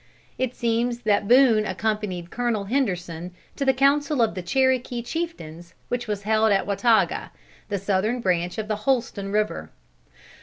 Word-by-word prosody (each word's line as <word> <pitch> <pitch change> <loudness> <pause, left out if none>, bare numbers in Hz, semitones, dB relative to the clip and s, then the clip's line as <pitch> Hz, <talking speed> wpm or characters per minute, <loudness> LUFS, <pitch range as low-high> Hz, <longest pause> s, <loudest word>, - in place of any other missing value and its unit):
It 255 -1 -1
seems 235 +1 0
that 205 -2 +1
Boone 245 -3 +5
accompanied 210 -5 -3
Colonel 235 -4 -1
Henderson 180 -7 -2 0.2
to 280 - -2
the 265 - +4
council 275 0 +2
of 225 - 0
the 185 - -5
Cherokee 250 +4 0
chieftains 175 - -6
which 245 -1 -2
was 205 -1 -3
held 220 +1 +2
at 195 - +2
Wataga, 200 -2 +2 0.4
the 200 - -1
southern 200 +5 0
branch 180 -3 0
of 215 -1 -3
the 215 -1 -1
Holston 210 -4 -1
River. 210 - -1
215 Hz, 150 wpm, -24 LUFS, 195-245 Hz, 0.4 s, Boone